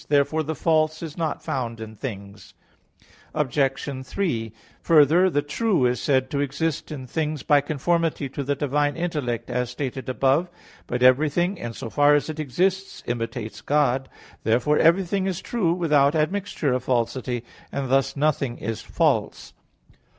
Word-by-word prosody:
Therefore 145 +2 +2
the 155 +1 -3
false 155 0 +1
is 155 -3 -6
not 160 -3 -3
found 115 -3 -3
in 110 0 -8
things. 100 -5 -8 0.8
Obj. 135 -2 -1
3: 130 - -2 0.3
Further, 165 +3 +5
the 145 -4 0
true 180 - +1
is 125 -1 +1
said 130 -2 +1
to 140 - -1
exist 145 +3 -2
in 135 -4 -6
things 150 +1 -2
by 145 -1 +4
conformity 155 +1 0
to 140 +2 -4
the 140 +1 0
divine 145 +1 0
intellect, 140 -9 -2
as 125 -1 -1
stated 130 +1 -5
above 135 +5 +2
(Q. 175 - -29
16). - - -24
But 125 0 -1
everything, 155 +9 +3
in 120 -5 -5
so 115 0 -7
far 145 +5 +5
as 145 +2 0
it 155 - -9
exists, 185 +7 -1
imitates 115 -1 -4
God. 135 -3 +1 0.3
Therefore 125 +7 +2
everything 190 +3 +3
is 185 -2 -2
true 200 -8 0
without 150 -4 +3
admixture 160 -3 0
of 125 -1 -1
falsity; 120 0 -1 0.3
and 140 -1 -3
thus 135 +1 +2
nothing 140 -4 0
is 115 -1 -4
false. - - 0
145 Hz, 160 wpm, -24 LUFS, 125-160 Hz, 0.8 s, Further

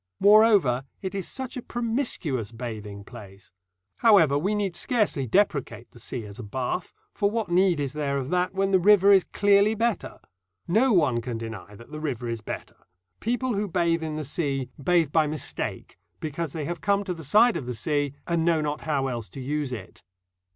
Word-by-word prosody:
Moreover, 200 - +5 0.2
it 190 - -3
is 195 -2 -3
such 260 -1 -5
a 250 - -4
promiscuous 225 - -2
bathing 110 -4 -7
place. 100 -5 -13 0.4
However, 195 - +5
we 190 +9 0
need 200 -4 -1
scarcely 205 - 0
depreciate 140 - 0
the 120 - -15
sea 115 0 -6
as 100 +1 -10
a - - -6
bath, 130 - -3 0.2
for 200 - +1
what 215 -4 -3
need 180 -2 +3
is 140 -2 -2
there 145 -2 -1
of 135 -1 -4
that 180 +1 0
when 195 0 +1
the 190 - +5
river 200 +1 +6
is 195 -2 +6
clearly 205 +1 +3
better? 230 0 -1 0.5
No 235 +9 +3
one 145 - +3
can 115 0 -4
deny 115 -3 -8
that 115 +6 -15
the 150 - -6
river 130 -6 -3
is 115 -1 -3
better. - - -7 0.4
People 245 +2 -1
who 205 0 -1
bathe 170 -2 +1
in 155 -1 -4
the 155 -1 -4
sea 135 -3 -2
bathe 170 -3 +2
by 155 -1 +3
mistake, 150 -2 -5 0.2
because 155 0 -4
they 155 -3 -4
have 170 0 -4
come 200 0 +1
to 185 -2 -3
the 165 -2 -9
side 215 - +4
of 145 -7 -4
the 125 - -3
sea, 145 +3 -1
and 170 -1 0
know 165 -1 +3
not 150 -1 -2
how 145 -4 -1
else 120 -4 -4
to 135 - -10
use 145 +1 -2
it. 105 -7 -8
155 Hz, 195 wpm, -26 LUFS, 130-200 Hz, 0.5 s, river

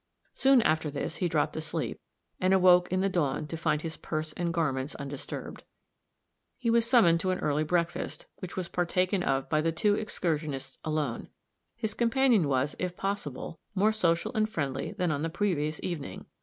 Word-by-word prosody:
Soon 265 -3 +5
after 155 -1 +2
this 140 -1 -4
he 180 - 0
dropped 155 -2 0
asleep, 155 -4 -3 0.4
and 185 +1 +4
awoke 180 -1 +5
in 185 0 +1
the 195 - +2
dawn 155 -7 0
to 160 - -5
find 155 -1 0
his 160 -1 -4
purse 155 -1 -4
and 170 +1 -1
garments 145 -4 -1
undisturbed. 140 -1 -6 0.9
He 235 -3 0
was 230 0 +4
summoned 190 -10 +5
to 185 - -1
an 185 - +1
early 150 -2 0
breakfast, 170 +2 -1
which 185 0 -8
was 185 -2 -2
partaken 180 +2 +1
of 135 -5 0
by 155 -1 +2
the 165 +1 +1
two 205 +5 +2
excursionists 155 -9 -2
alone; 155 -6 -2 0.5
his 220 -2 -2
companion 235 - +3
was, 135 +1 +1
if 180 -1 -3
possible, 165 -6 -4 0.2
more 205 +3 +4
social 170 -6 +1
and 215 -2 +1
friendly 140 -10 -3
than 180 -3 0
on 145 -1 -1
the 165 - -1
previous 160 -4 -1
evening. 165 -6 -5
170 Hz, 175 wpm, -29 LUFS, 150-190 Hz, 0.9 s, Soon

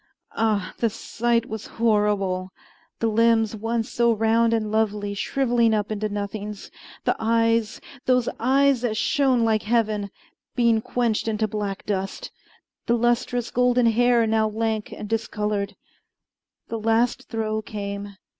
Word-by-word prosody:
Ah! 215 -3 0
the 230 - +2
sight 230 +1 -1
was 220 -1 -6
horrible: 205 -4 +1 0.5
the - - 0
limbs 225 0 +3
once 225 +1 -2
so 235 0 +3
round 225 +1 +2
and 220 -2 0
lovely 210 -2 0
shriveling 235 0 +1
up 210 0 -2
into 215 0 -2
nothings; 205 0 -5 0.3
the - - +2
eyes 230 0 +1 0.3
those 250 -2 +3
eyes 270 +1 +3
that 225 -3 -1
shone 260 -2 +2
like 220 -1 +2
heaven 215 -2 0 0.5
being 230 -2 +3
quenched 230 -2 -1
into 215 0 0
black 205 -2 -4
dust; 195 -2 -3 0.6
the 235 -1 +3
lustrous 240 0 0
golden 250 0 +3
hair 235 +1 +4
now 220 0 +2
lank 220 0 -2
and 210 - -7
discolored. 210 -2 -2 0.9
The 230 - -3
last 225 +2 +1
throe 220 -1 -2
came. 200 -1 -6
225 Hz, 135 wpm, -24 LUFS, 210-235 Hz, 0.9 s, hair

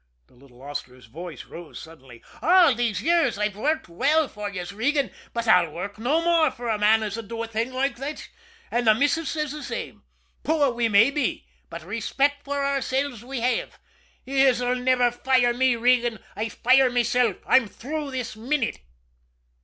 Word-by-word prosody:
The - - -28
little 125 0 -19
hostler's 130 -3 -8
voice 160 +5 -9
rose 170 -2 -11
suddenly. 135 -7 -14 0.2
"All 350 -4 +6
these 230 -4 -1
years 340 -7 +2
I've 210 -1 -1
worked 305 +9 -1
well 285 - +1
for 210 -3 -6
yez, 180 -2 -6
Regan, 275 +6 0 0.2
but 235 0 -3
I'll 180 -6 +5
work 190 +7 -7
no 290 +9 +1
more 335 -3 +3
for 240 -2 -6
a 215 -2 0
man 220 +1 +4
as 215 +1 -4
'ud 225 - -8
do 230 +1 -4
a - - -5
thing 225 +3 -2
loike 270 +1 -1
thot 280 +4 -6 0.4
an' 240 0 0
the 215 -1 +6
missus 290 +6 +1
ses 305 -3 -2
the 300 0 -7
same. - - -6 0.4
Poor 300 -4 +2
we 235 -1 0
may 220 +6 +5
be, 285 -3 -2 0.2
but 170 -1 -8
rayspect 270 - -1
for 285 0 -2
oursilves 275 -3 -1
we 255 -1 -5
have. 250 +1 -1 0.5
Yez'll 255 -2 +2
niver 250 -1 +2
fire 245 0 +2
me, 255 0 +2
Regan 240 -1 +2 0.2
I 220 +2 -3
fire 255 +3 +4
mesilf. 245 -3 +1
I'm 260 -4 +4
through 290 +7 -5
this 255 -4 -5
minute!" 240 - -2
245 Hz, 175 wpm, -24 LUFS, 210-275 Hz, 0.5 s, All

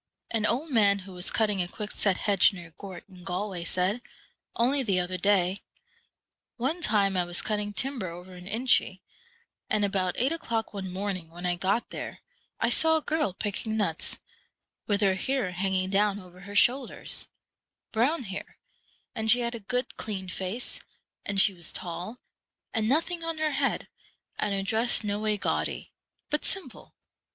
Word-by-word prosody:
An 220 -2 +1
old 285 +7 0
man 205 -5 +5
who 195 - -10
was 180 0 +1
cut 220 - +3
ting 205 -3 0
a 175 - -1
quickset 205 -1 -1
hedge 205 -1 +4
near 170 -3 -10
Gort, 195 -3 -8
in 180 -1 -14
Galway, 180 0 -3
said, 185 +7 +1 0.5
only 265 +4 +3
the 195 -7 +2
other 180 +1 -2
day, 190 -1 +3 0.5
' - - -58
One 335 +5 -1
time 200 - +2
I 180 - +3
was 175 0 +3
cut 215 - 0
ting 205 0 -3
timber 250 -2 -2
over 180 +2 -10
in 180 0 -10
Inchy, 220 -4 +2 0.7
and 210 -1 +3
about 190 -2 0
eight 260 +5 +2
o'clock 230 -10 -2
one 190 -2 -4
morning, 185 -3 -3
when 175 +2 -8
I 180 - +2
got 195 +6 0
there, - - -6 0.4
I 225 - +2
saw 320 +4 +5
a - - -2
girl 305 - 0
picking 215 +3 -2
nuts, 180 -7 0 0.7
with 205 -1 +2
her 195 -2 +4
hair 255 0 -1
hanging 185 +1 0
down 205 0 +2
over 180 -2 -14
her 200 +2 -9
shoulders; 250 +4 +3 0.6
brown 260 +6 +2
hair; 195 -3 -7 0.6
and 220 0 -1
she 245 +2 +7
had 235 0 -1
a 235 - -5
good, 250 +5 -2
clean 190 -4 -4
face, 190 +7 -3 0.5
and 200 -1 +2
she 195 0 +6
was 170 -3 -1
tall, 180 +6 -3 0.6
and 220 -1 +1
noth 315 +6 +3
ing 340 -1 -4
on 330 -1 -2
her 310 -1 +1
head, - - 0 0.5
and 210 - +1
her 195 - -1
dress 225 +4 +2
no 205 0 -1
way 215 -1 +1
gaudy, - - -1 0.4
but 300 - +1
simple. 390 - -1
205 Hz, 180 wpm, -28 LUFS, 185-235 Hz, 0.7 s, she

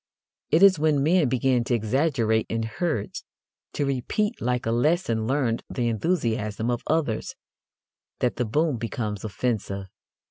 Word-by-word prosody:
It 160 +5 +4
is 190 -5 +7
when 150 -3 +2
men 165 -2 +3
begin 130 -1 +2
to 120 - +1
exaggerate 115 -1 +1
in 115 0 -1
herds 115 - -3 0.5
to 145 - 0
repeat 140 - -1
like 125 0 -1
a 115 - 0
lesson 120 -3 +1
learned 130 -4 0
the 120 -2 -1
enthusiasm 115 - -1
of 120 - -2
others 145 -9 -1 0.8
that 125 - 0
the 125 - 0
boom 150 +4 +1
becomes 110 -3 -4
offensive. 105 -3 -2
125 Hz, 140 wpm, -25 LUFS, 110-150 Hz, 0.8 s, is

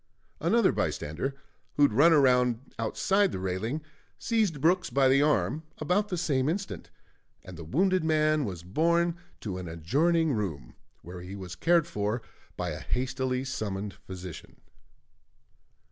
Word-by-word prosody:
Another 230 -4 +3
bystander, 105 - -2 0.4
who 145 - +3
had 140 - +4
run 150 +9 +6
round 125 -3 +3
outside 195 - +2
the - - -4
railing, 95 +11 -3 0.3
seized 215 -10 0
Brooks 175 +4 +2
by 135 -1 +3
the 135 +2 +5
arm 150 +1 +1 0.2
about 205 +3 0
the 180 - -2
same 145 -5 +1
instant; 195 +4 -4 0.5
and 95 - -10
the 85 - -8
wounded 185 - +1
man 155 -1 +2
was 90 -7 -5
borne 170 - +1 0.3
to 95 -4 -4
an 90 - -6
adjoining 145 - +1
room, 95 - -4 0.3
where 90 +1 -8
he 90 +2 -8
was 95 -3 -7
cared 170 - +3
for 115 -7 -2 0.3
by - - -2
a - - -5
hastily 130 0 -2
summoned 105 -6 -4
physician. 90 -3 -10
135 Hz, 145 wpm, -28 LUFS, 100-165 Hz, 0.5 s, run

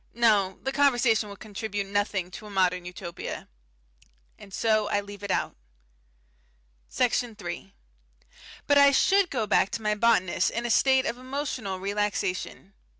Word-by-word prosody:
No, 210 -5 +3
the 270 - -1
conversation 245 -6 +2
would 200 - -9
contribute 205 -1 -4
nothing 195 -2 -1
to 210 - -9
a - - -10
modern 180 -2 +1
Utopia. 175 -1 -7 0.9
And 195 - -13
so 215 0 +1
I 205 - +1
leave 205 0 -9
it 200 - -6
out. - - -1 1.3
Section 245 -2 0
3 175 - -7 0.9
But 285 0 +5
I 280 0 +8
should 380 +7 +3
go 235 -5 -1
back 195 - +3
to - - -3
my 210 0 +2
botanist 210 -5 +2
in 235 +1 -3
a 240 - 0
state 265 +2 +4
of 240 - -3
emotional 255 -7 -4
relaxation. 200 -1 -3
210 Hz, 150 wpm, -27 LUFS, 195-240 Hz, 1.3 s, I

